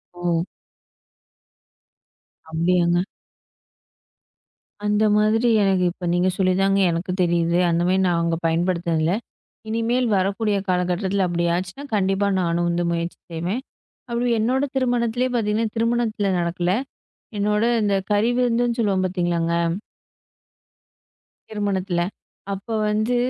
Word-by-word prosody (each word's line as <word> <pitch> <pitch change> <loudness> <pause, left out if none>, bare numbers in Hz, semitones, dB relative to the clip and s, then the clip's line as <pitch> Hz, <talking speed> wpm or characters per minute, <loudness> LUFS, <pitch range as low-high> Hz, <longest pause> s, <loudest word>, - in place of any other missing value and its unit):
ஓ! 175 0 -1 2.0
அப்பிடியாங்க. 170 +1 +2 1.9
அந்த 210 +1 +2
மாதிரி 225 +3 +3
எனக்கு 190 -2 +2
இப்போ 180 0 -8
நீங்கச் 180 +1 +1
சொல்லி 185 -1 +2
தாங்க 195 0 +3
எனக்குத் 180 +2 -3
தெரியுது. 170 -1 +2
அந்தமாரி 175 +2 +2
நான் 175 -1 +1
அங்க 165 0 +1
பயன்படுத்துனது 170 0 0
இல்ல. 165 +3 +2 0.6
இனிமேல் 235 +3 0
வரக்கூடிய 200 +2 0
காலகட்டத்தில 185 +2 0
அப்பிடி 170 0 -1
ஆச்சுன்னா, 185 +10 -5
கண்டிப்பா 195 0 +1
நானும் 175 0 0
வந்து 175 0 0
முயற்சி 170 0 -3
செய்வேன். 175 +10 -2 0.5
அப்பிடி 240 +1 0
என்னோட 255 +5 +1
திருமணத்திலேயே 245 0 0
பார்த்தீங்கன்னா, 220 -1 0
திருமணத்துல 230 -3 0
நடக்கல. 175 +1 -1 0.7
என்னோட 210 +1 +1 0.2
அந்தக் 200 -2 0
கறி 215 +4 +3
விருந்துன்னு 240 -1 +1
சொல்லுவோம். 195 -3 +1
பாத்தீங்களாங்க. 175 -2 -1 2.0
திருமணத்துல. 195 -4 -1 0.5
அப்போ 205 +4 -6 0.2
வந்து 215 +3 +1
190 Hz, 105 wpm, -22 LUFS, 175-220 Hz, 2.0 s, மாதிரி